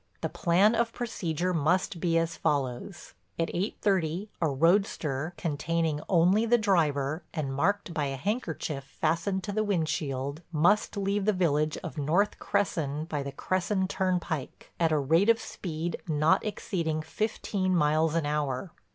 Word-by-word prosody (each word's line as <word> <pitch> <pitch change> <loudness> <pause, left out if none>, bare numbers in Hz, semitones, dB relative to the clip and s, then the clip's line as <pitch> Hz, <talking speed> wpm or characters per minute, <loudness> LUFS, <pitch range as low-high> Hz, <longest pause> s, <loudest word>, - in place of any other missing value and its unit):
"The - - -1
plan 185 +6 +3
of 230 0 0
procedure 180 -7 -2
must 170 +3 +1
be 165 0 +2
as 165 0 0
follows: 140 +4 -2 0.2
At 165 - -1
eight 190 +5 -2
thirty 190 0 0
a 160 - +3
roadster, 160 -1 +1
containing 160 -1 -1
only 185 +4 +4
the 240 +1 +5
driver 155 -7 +1
and 140 -4 -2
marked 190 +6 0
by 150 -3 0
a 135 -1 -2
handkerchief 160 - -3
fastened 170 +7 -1
to 205 - -3
the 215 +2 0
windshield, 155 -6 -1
must 175 +7 +2
leave 200 0 0
the 215 - +3
village 155 -4 +1
of 160 -4 -5
North 175 +9 +1
Cresson 160 -7 -1
by 150 -3 -3
the 140 0 -5
Cresson 185 +5 0
turnpike, 180 -7 -2
at 165 -2 +3
a 155 - +3
rate 165 +9 +3
of 230 0 +5
speed 170 -1 -5
not 155 0 +3
exceeding 165 -7 -2
fifteen 190 +1 -1
miles 155 0 +2
an 165 -3 +1
hour. 145 +1 -2
165 Hz, 150 wpm, -28 LUFS, 150-195 Hz, 0.2 s, the